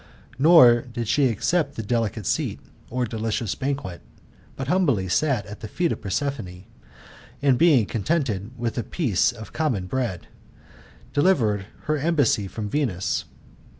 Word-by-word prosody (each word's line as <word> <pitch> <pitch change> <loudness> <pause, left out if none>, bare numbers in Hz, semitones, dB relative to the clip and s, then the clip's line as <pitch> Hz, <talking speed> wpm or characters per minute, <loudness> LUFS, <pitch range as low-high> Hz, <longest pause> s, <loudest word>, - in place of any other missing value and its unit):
Nor 135 -6 +7
did 120 -2 -4
she 140 +4 +3
accept 140 - 0
the 110 - -4
delicate 110 -1 -1
seat, - - -1 0.3
or 125 +1 -1
delicious 110 -1 -2
banquet; 135 -10 -4 0.5
but 135 - -5
humbly 140 - +2
sat 130 +2 +1
at 105 +1 -9
the 110 - -7
feet 170 +9 -1
of - - -4
Prosperine, 100 -4 -3 0.8
and 140 -2 +3
being 145 -6 +4
contented 115 - -1
with 120 0 -2
a - - -2
piece 120 - +1
of 110 -2 -11
common 130 - -1
bread, 115 -4 -3 0.9
delivered 115 - +2 0.2
her 155 -1 0
embassy 145 - +2
from 105 +2 -5
Venus. 105 -7 -1
120 Hz, 140 wpm, -24 LUFS, 105-145 Hz, 0.9 s, Nor